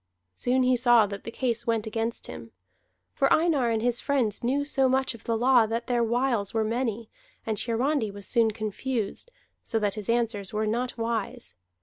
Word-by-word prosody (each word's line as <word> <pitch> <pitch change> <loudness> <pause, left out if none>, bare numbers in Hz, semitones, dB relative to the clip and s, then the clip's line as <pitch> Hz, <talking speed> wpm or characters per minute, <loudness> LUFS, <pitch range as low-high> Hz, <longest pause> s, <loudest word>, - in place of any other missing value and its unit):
Soon 255 - +1
he 255 0 +4
saw 240 -2 +5
that 200 -1 -7
the 230 - -5
case 235 -1 -2
went 225 -1 +1
against 225 +1 -3
him. 115 - -9 0.6
For 275 - +1
Einar 310 -7 +3
and 225 -1 0
his 245 0 +1
friends 250 -8 0
knew 275 +4 +1
so 270 -2 +2
much 265 0 +1
of 230 - -14
the 230 -1 0
law 245 -1 +4
that 230 +2 -2
their 240 -2 +1
wiles 235 -3 0
were 220 - +2
many, 230 0 -2 0.4
and 220 - -1
Hiarandi 240 +1 0
was 200 0 -9
soon 230 0 +3
confused, 220 - -3 0.3
so 225 - -1
that 205 -2 0
his 215 -1 -5
answers 230 -4 0
were 215 +1 0
not 240 +4 -2
wise. 225 - -3
230 Hz, 190 wpm, -27 LUFS, 220-250 Hz, 0.6 s, saw